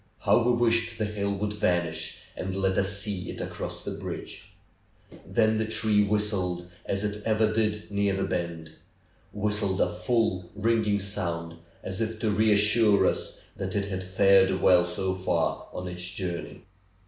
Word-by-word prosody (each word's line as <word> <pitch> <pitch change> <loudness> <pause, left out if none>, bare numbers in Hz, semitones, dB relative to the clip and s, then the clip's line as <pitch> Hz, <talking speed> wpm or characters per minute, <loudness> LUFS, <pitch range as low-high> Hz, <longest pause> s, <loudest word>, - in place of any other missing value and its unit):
How - - +4
we 120 +1 +3
wished 115 -1 +2
the 110 - 0
hill 100 -1 -2
would 105 +1 -2
vanish 85 -6 -1
and 95 0 -4
let 95 -1 +1
us 100 0 +1
see 100 -3 -2
it - - -5
cross - - -5
the - - -4
bridge! - - -7 0.7
Then 110 -1 +2
the 110 0 -1
train 110 -2 +2
whistled, 100 -4 0 0.2
as 100 +1 0
it 105 0 -3
ever 110 0 +2
did 105 -1 -1
near 100 -1 +1
the 95 - -1
bend; 85 -4 -3 0.6
whistled 105 -2 0
a 90 - +1
full, 90 -1 0
ringing 110 -1 +1
sound, 85 -4 -3 0.3
as 95 +4 -4
if 110 0 -2
to 110 - +1
reassure 105 0 +4
us - - -2
that 95 0 -4
it 100 -1 0
had 95 -1 -3
fared 95 0 +4
well 90 0 +5
so 95 +2 -2
far 95 0 -1
on 90 - -6
its 90 0 -5
journey. 90 -3 -5
100 Hz, 160 wpm, -27 LUFS, 95-105 Hz, 0.7 s, well